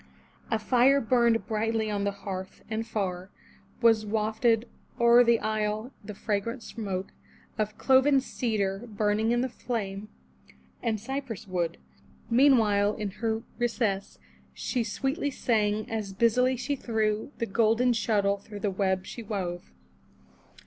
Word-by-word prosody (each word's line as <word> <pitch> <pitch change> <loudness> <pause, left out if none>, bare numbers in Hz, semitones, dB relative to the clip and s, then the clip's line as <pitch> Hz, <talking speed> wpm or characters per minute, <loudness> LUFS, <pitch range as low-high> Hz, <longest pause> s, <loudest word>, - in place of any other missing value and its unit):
A 225 - +2
fire 250 +5 +4
burned 235 -2 +2
brightly 220 0 -1
on 200 -1 -1
the 200 - +1
hearth, 190 -1 -7
and 220 +1 -1
jar^ 190 -5 -3 0.6
Was 225 -2 +5
wafted 220 +2 +1 0.3
o'er 235 +1 +7
the 235 -1 +4
isle 215 +2 -2
the 205 0 -8
fragrant 225 +4 -2
smoke 195 -4 -5 0.5
Of 215 0 -1
cloven 270 +1 +5
cedar 215 -5 -2
burning 215 +1 +1
in 240 0 +2
the 260 - 0
flame, 215 -5 -4 0.7
And 220 -2 -1
cypress 255 -2 -5
wood. 175 -3 -2 0.5
Meanwhile, 220 -6 +4
in 210 -2 -3
her 225 -1 0 0.2
recess. 225 -5 -1 0.4
She 235 - -1
sweetly 270 +7 -1
sang, 215 -5 0
as 215 -3 -4
busily 250 +5 +3
she 285 +4 -2
threw 220 -1 -1
The 230 - -1
golden 230 +3 +3
shuttle 205 -3 +1
through 205 0 -10
the 205 - 0
web 190 -1 0
she 235 - -7
wove. 185 -5 -4
220 Hz, 135 wpm, -28 LUFS, 205-235 Hz, 0.7 s, o'er